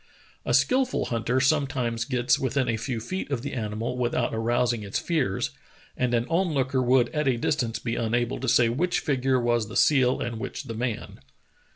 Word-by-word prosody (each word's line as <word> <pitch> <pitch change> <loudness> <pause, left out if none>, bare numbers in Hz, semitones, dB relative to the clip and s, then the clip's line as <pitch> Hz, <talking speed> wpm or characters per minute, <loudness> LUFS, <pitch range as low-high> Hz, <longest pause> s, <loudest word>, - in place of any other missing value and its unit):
A - - +3
skilful 255 0 +2
hunter 120 +2 0
sometimes 130 -5 +1
gets 125 -2 +1
within 130 0 0
a 115 - +1
few 115 +1 -3
feet 185 +12 -5
of 130 -4 -2
the 140 - -4
animal 115 +1 -3
without 120 0 0
arousing 120 +1 +1
its 100 -1 -3
fears, 140 - -1 0.4
and 125 -1 0
an 115 0 +1
on 170 -1 0
looker 130 -1 +1
would 125 -1 +3
at 150 -2 -1
a 130 -3 +2
distance 120 -2 -1
be 115 -1 -3
unable 120 +2 0
to - - -1
say 120 - +5
which 165 +10 0
figure 130 -2 +1
was 120 -2 +1
the 115 - -4
seal 130 -4 +4
and 115 -1 -4
which 135 - -5
the 120 -4 -6
man. 115 0 -4
125 Hz, 190 wpm, -26 LUFS, 115-135 Hz, 0.4 s, say